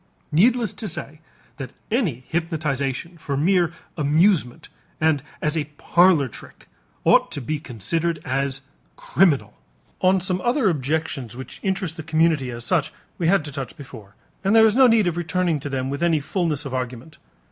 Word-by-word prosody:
Needless 230 +8 +3
to 220 - -5
say 155 -3 -6 0.4
that 135 -4 -7 0.2
any 180 - 0
hypnotization 160 -1 -2
for 140 -2 -3
mere 175 +2 +2 0.2
amusement 150 -3 +2 0.3
and 155 -3 +2 0.2
as 150 +1 +1
a 155 -2 0
parlor 175 -5 +4
trick 115 - -12 0.4
ought - - +4
to - - -3
be 150 +4 -3
considered 155 - -2
as 135 +1 -1 0.3
criminal. 140 - +2 0.5
On 185 +1 +4
some 185 0 -1
other 240 -4 +2
objections 140 -5 -3
which 130 - -9
interest 190 -3 -2
the - - -4
community 155 -3 +1
as 120 -1 -6
such 165 -6 +1 0.3
we 170 - +1
had 190 -3 +3
to 150 - -5
touch 135 +2 -6
before, 115 -9 -12 0.3
and 200 +3 +3
there 225 0 +8
is 220 - +4
no 260 0 +7
need 225 -3 +4
of 175 -1 -1
returning 175 -2 0
to 145 - -6
them 135 0 -2
with 140 - -4
any 170 -2 +3
fullness 155 -1 -2
of 135 - -5
argument. 125 +4 -5
155 Hz, 170 wpm, -23 LUFS, 135-180 Hz, 0.5 s, there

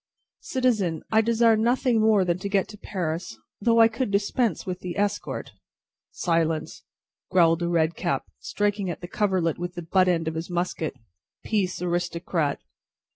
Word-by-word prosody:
"Citizen, 215 - 0
I 220 0 +5
desire 230 0 +4
nothing 235 +1 +2
more 215 -3 +4
than 175 0 0
to 200 - -4
get 195 -1 +1
to 210 - -10
Paris, 170 - -4 0.2
though 230 +2 +3
I 225 - +8
could 230 +1 -2
dispense 205 +3 0
with 185 -1 -4
the 180 -2 -6
escort." 205 0 -2 0.6
"Silence!" 165 -2 -1 0.5
growled 165 -2 +4
a 170 - 0
red 165 -1 +2
cap, 175 - -1
striking 205 -2 -1
at 175 - -5
the 175 - -6
coverlet 185 -5 0
with 175 +1 -4
the 175 - -5
butt 185 +3 +3
end 165 -3 +1
of 160 - -1
his 160 +2 -5
musket. 175 -4 -2 0.5
"Peace, 190 -5 -1
aristocrat!" 170 -3 -1
185 Hz, 160 wpm, -25 LUFS, 170-215 Hz, 0.6 s, I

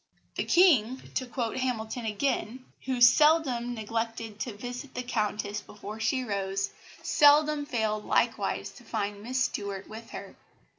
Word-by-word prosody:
"The - - -2
King," 265 - +4
to 255 - -2
quote 240 -1 -3
Hamilton 245 -2 -2
again, 250 +2 -2 0.2
"who 255 -2 -2
seldom 250 -3 +5
neglected 225 0 -4
to 220 -3 -4
visit 245 +4 -7
the 250 - -2
Countess 210 -3 -2
before 210 +1 -9
she 255 +4 0
rose, 195 -3 -2 0.3
seldom 295 0 +4
failed 220 -5 -1
likewise - - 0
to - - -15
find 205 0 -3
Miss 255 +4 0
Stuart 200 -5 -3
with 225 +1 -10
her. - - -8
235 Hz, 140 wpm, -28 LUFS, 210-260 Hz, 0.3 s, seldom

